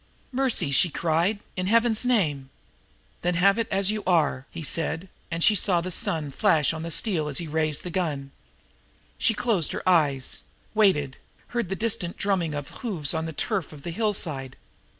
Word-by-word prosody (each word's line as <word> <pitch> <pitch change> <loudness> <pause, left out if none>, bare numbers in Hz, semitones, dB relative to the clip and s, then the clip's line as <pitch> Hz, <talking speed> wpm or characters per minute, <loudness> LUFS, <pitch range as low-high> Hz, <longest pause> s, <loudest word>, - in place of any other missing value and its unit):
"Mercy!" 250 - +2
she 170 +6 +4
cried. 170 +7 0
"In 185 -1 -2
Heaven's 230 +1 +3
name 155 - +1 0.4
" - - -36
"Then 175 0 0
have 195 +5 +4
it 230 - 0
as 195 0 +2
you 215 0 -3
are!" 150 -6 +1
he 165 - -8
said, 165 +4 -2 0.2
and 165 0 0
she 215 - +6
saw 185 -3 +3
the 180 +2 -4
sun 160 -6 0
flash 150 +2 +2
on 160 - -5
the 165 - -5
steel, 165 -2 +2
and 145 - -3
he 170 - -4
raised 155 -1 0
the 180 - -5
gun. 150 -6 -2 0.9
She 225 - +2
closed 205 -9 0
her - - -5
eyes 145 -7 +2 0.3
waited 185 -11 +2 0.3
heard 235 -6 -2
the 195 - -1
distant 200 -5 -2
drumming 180 -6 0
of 145 -1 -7
hoofs 180 - 0
on 160 0 -2
the - - -4
turf 190 +2 -2
of 145 -2 -12
the 170 - -4
hillside. 165 - -1
170 Hz, 185 wpm, -25 LUFS, 150-200 Hz, 0.9 s, she